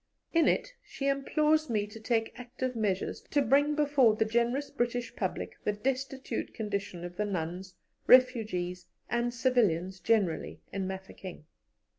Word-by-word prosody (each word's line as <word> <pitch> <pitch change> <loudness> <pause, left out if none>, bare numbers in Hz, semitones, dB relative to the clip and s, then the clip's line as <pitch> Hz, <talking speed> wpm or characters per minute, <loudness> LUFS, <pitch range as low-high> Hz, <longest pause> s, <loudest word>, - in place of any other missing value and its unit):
In 330 -1 +4
it - - +1
she 275 - -4
implores 305 +2 +2
me 210 -3 +1
to 210 +2 -11
take 225 0 0
active 250 +1 -4
measures 205 -4 -1
to 290 - +2
bring 285 +3 +3
before 280 -7 +4
the 220 - +1
generous 235 +5 0
British 240 -3 -2
public 190 -3 -3
the 210 - +1
destitute 265 +4 -3
condition 200 -5 -3
of 175 0 -8
the 210 - 0
nuns, 185 0 -4 0.3
refugees, 215 -9 +3 0.2
and 240 +1 +1
civilians 205 -8 +1
generally, 200 -8 0
in 190 -1 -2
Mafeking. 190 -3 -8
230 Hz, 140 wpm, -30 LUFS, 190-260 Hz, 0.3 s, In